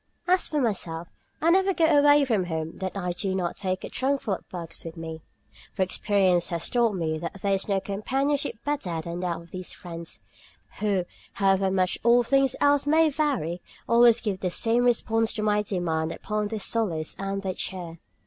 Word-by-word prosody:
As 365 +1 +3
for 300 - -1
myself, 175 - -2 0.3
I 335 - +5
never 385 +1 +3
go 330 - +3
away 290 -2 +5
from 215 -8 +1
home 160 -1 -4
that 190 +1 -4
I 180 -2 -2
do 190 +2 -1
not 180 -2 -1
take 185 -1 -3
a - - -4
trunkful 265 -5 0
of - - -14
books 170 -2 -6
with 165 0 -8
me, 160 -1 -6 0.5
for 190 - +2
experience 185 -2 +2
has 170 -1 -1
taught 235 -3 +2
me 160 -3 -1
that 170 +4 -6
there 200 -1 +2
is 195 +2 -1
no 195 -1 +2
companionship 270 +9 -1
better 235 - -2
than 170 +2 -5
that 175 -2 -1
of 170 0 -15
these 185 -1 -4
friends, 170 -1 -8 0.6
who, 200 -4 +1 0.3
however 195 -1 +2
much 185 -1 0
all 240 +1 +5
things 270 +1 +2
else 285 0 +3
may 315 +1 +4
vary, 255 - -1 0.3
always 235 0 +6
give 200 -4 -2
the 185 - -1
same 230 +6 +2
response 225 -2 +2
to 215 - -2
my 210 0 +2
demand 165 -5 -1
upon 210 +2 -2
their 220 +1 -4
solace 190 -7 -1
and 195 0 -3
their 190 -1 -2
cheer. 175 -3 -5
195 Hz, 190 wpm, -26 LUFS, 175-240 Hz, 0.6 s, always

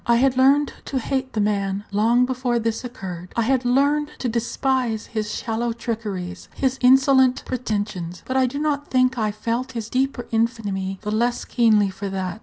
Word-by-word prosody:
I 235 - +5
had 260 +2 +3
learned 275 +2 +4
to 270 - -3
hate 260 +1 -2
the 215 - -1
man 200 -1 0
long 230 +5 +3
before 250 -1 -1
this 230 0 -1
occurred; 185 -7 -7
I 230 - +2
had 260 +2 +1
learned 285 +4 +2
to 255 - -2
despise 235 0 -1
his 215 -2 -3
shallow 230 +2 -2
trickeries, 210 -6 -5
his 265 -1 0
insolent 265 0 +5
pretensions; 205 -8 -3
but 260 - -3
I 260 -1 +4
do 265 +3 -5
not 290 -1 -1
think 255 -1 +2
I 215 -1 +1
felt 235 +5 -3
his 225 -2 -5
deeper 260 -1 0
infamy 210 -5 -1
the 210 - -2
less 240 +3 0
keenly 215 -5 +3
for 200 +1 -5
that. 190 0 -4
235 Hz, 180 wpm, -22 LUFS, 210-260 Hz, -, I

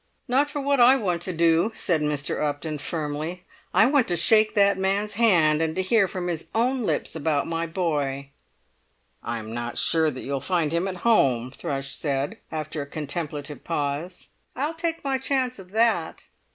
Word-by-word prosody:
"Not 275 +4 +2
for 290 0 -4
what 280 -1 +1
I 245 +2 +7
want 180 -9 -1
to 185 - -3
do," 170 +4 +2
said 165 -4 0
Mr. 150 -1 -1
Upton 150 +1 -3
firmly. 155 +3 -3 0.3
"I 220 - +5
want 270 -1 +3
to 175 - +1
shake 215 +5 +4
that 200 -1 +4
man's 195 +2 -1
hand, 170 -9 +4
and 160 -1 -1
to 190 - 0
hear 200 +1 +3
from 180 -1 -5
his 165 -2 -3
own 250 +3 +1
lips - - -1
about 155 -2 0
my 165 0 -2
boy!" 145 -6 -2 0.9
"I'm 115 -1 -5
not 120 0 -4
sure 160 -1 +4
that 130 -3 -7
you'll 140 0 -2
find 170 -1 0
him 170 +3 0
at 185 -1 -4
home," 130 - +3
Thrush 135 0 -4
said, 140 -1 -2
after 155 -1 -4
a 140 - -6
contemplative 150 -1 -5
pause. 155 +3 -3 0.3
"I'll 295 +5 -1
take 330 0 -3
my 270 -2 0
chance 260 -3 -1
of 185 -1 -12
that." 220 -5 +1
170 Hz, 180 wpm, -25 LUFS, 150-215 Hz, 0.9 s, I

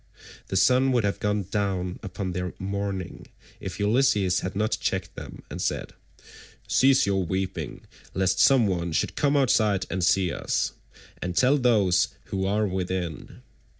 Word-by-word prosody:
The - - -4
sun 125 +8 +4
would 120 -3 +2
have 100 -1 -1
gone 105 0 0
down 95 -2 -2
upon 95 -1 -4
their 90 0 -4
mourning 100 -1 -4 0.3
if - - -6
Ulysses 105 -4 +2
had 95 0 -5
not 105 +2 0
checked - - -2
them - - -9
and - - -5
said: - - -2 0.7
"Cease 135 0 +4
your 95 -1 +1
weeping, 95 +2 -3 0.3
lest 95 -1 +1
some 135 -4 +5
one 85 -4 -1
should - - 0
come 145 0 +2
outside 110 -7 +2
and 95 -1 -1
see 90 0 +3
us, - - -1 0.5
and 90 -1 -4
tell 130 +3 +5
those 105 -8 +3 0.2
who 95 0 -1
are 105 +2 +1
within. 90 -7 -4
95 Hz, 150 wpm, -26 LUFS, 90-105 Hz, 0.7 s, some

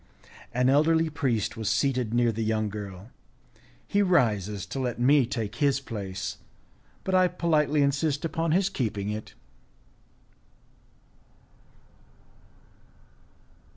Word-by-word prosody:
An 125 +1 +1
elderly 160 +4 +3
priest 125 -7 -1
was 110 -2 -2
seated 125 0 0
near 120 0 +2
the 115 +1 -3
young 110 -1 0
girl, 100 +1 -8 0.7
he 205 - +1
rises 105 - +1
to 135 - -5
let 125 -2 -2
me 135 0 +4
take 115 -3 -4
his 140 -1 +2
place, 95 - -5 0.6
but 190 - -2
I 185 -1 +5
politely 155 -4 +1
insist 145 +2 0
upon 165 0 -1
his 185 +3 +3
keeping 105 - -2
it. 105 0 -7
125 Hz, 110 wpm, -27 LUFS, 110-150 Hz, 0.7 s, I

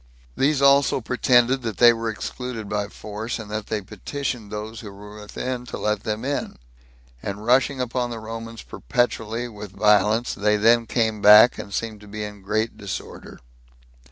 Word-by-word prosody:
These 140 0 +2
also 140 0 +5
pretended 125 +1 +2
that 110 -5 -4
they 120 -1 +7
were 115 0 -3
excluded 115 0 -5
by 105 0 -2
force, 105 +3 -6
and 105 -2 -9
that 105 0 -4
they 110 -1 -2
petitioned 110 +3 -5
those 105 +1 -6
that 105 -3 -9
were 105 +1 -11
within 125 +4 -4
to - - -6
let 105 -1 -1
them 110 +2 -3
in; 140 +1 -3 0.6
and 100 +2 -5
rushing 130 +2 +3
upon 125 0 -1
the 115 - -5
Romans 115 +1 -7
perpetually, 115 - -2
with 105 -4 -10
violence, 105 +3 +3
they 105 +1 +1
then 115 +2 +4
came 110 -3 0
back, 105 +4 +8
and 100 - -7
seemed 110 +1 -4
to 105 - -14
be 105 +1 -6
in 105 -1 -8
great 110 +3 -1
disorder. 100 -2 -7
110 Hz, 170 wpm, -23 LUFS, 105-120 Hz, 0.6 s, back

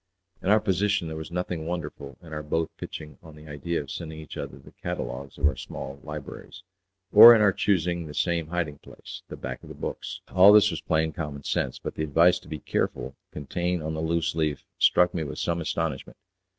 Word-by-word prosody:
In 95 - -2
our 105 +1 +6
position 100 -3 +1
there 80 - -5
was 80 0 -6
nothing 85 -2 -3
wonderful 75 -5 -5
in 80 -2 -11
our 75 - -3
both 80 +2 -1
pitching 75 -3 -8
on 80 -2 -13
the 75 0 -14
idea 75 +3 -3
of 70 -3 -7
sending 80 -2 -6
each 80 -1 -9
other 65 - -6
the 70 - -16
catalogues 65 +3 -5
of - - +1
our 75 - +3
small 70 +1 -7
libraries, 75 +4 -9 0.5
or 115 +3 +11
in 110 - +3
our 100 -2 +5
choosing 85 -4 0
the 75 - -9
same 85 -3 0
hiding 80 -4 -3
place - - -11
the - - -8
back 65 0 -6
of - - -13
the - - -9
books; - - -5
all 95 +2 +8
this 105 -1 +6
was - - -4
plain 80 0 0
common 75 -2 -5
sense; 65 - -1
but - - -6
the 80 - -3
advice 85 +4 +4
to - - -18
be 75 - -5
careful 65 -1 -2 0.2
contained 85 +3 -2
on 80 +1 -3
the 80 - -3
loose 85 +1 0
leaf 75 -4 -1
struck 90 0 +4
me 80 - -2
with 70 - -6
some 85 0 -1
astonishment. 80 -3 -3
80 Hz, 215 wpm, -26 LUFS, 75-85 Hz, 0.5 s, or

